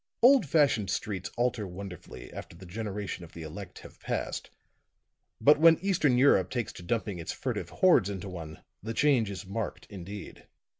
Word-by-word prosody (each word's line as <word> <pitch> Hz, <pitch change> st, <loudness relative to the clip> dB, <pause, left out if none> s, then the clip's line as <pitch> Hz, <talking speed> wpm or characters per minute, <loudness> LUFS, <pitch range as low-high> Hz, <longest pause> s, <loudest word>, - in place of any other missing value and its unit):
Old 255 Hz, -, +7 dB
fashioned 135 Hz, -, +3 dB
streets 95 Hz, -4 st, -2 dB
alter 120 Hz, -4 st, 0 dB
wonderfully 90 Hz, 0 st, -9 dB
after -, -, -8 dB
the 90 Hz, +2 st, -12 dB
generations 100 Hz, 0 st, -5 dB
of 85 Hz, -, -13 dB
the 85 Hz, -, -8 dB
elect 90 Hz, +4 st, -8 dB
have -, -, -14 dB
passed; -, -, -3 dB, 0.9 s
but 150 Hz, +1 st, +6 dB
when 165 Hz, 0 st, +7 dB
Eastern 165 Hz, -9 st, +2 dB
Europe 110 Hz, -9 st, +5 dB
takes 120 Hz, -3 st, -3 dB
to -, -, -10 dB
dumping 105 Hz, -1 st, -2 dB
its 80 Hz, -, -4 dB
furtive -, -, -3 dB
hordes 175 Hz, -, +4 dB
into 100 Hz, -1 st, -5 dB
one, 80 Hz, -4 st, -8 dB, 0.2 s
the 110 Hz, +2 st, -5 dB
change 130 Hz, -7 st, +3 dB
is 100 Hz, 0 st, -6 dB
marked 100 Hz, +3 st, -4 dB
indeed. 100 Hz, +1 st, -9 dB
105 Hz, 165 wpm, -29 LUFS, 95-130 Hz, 0.9 s, Old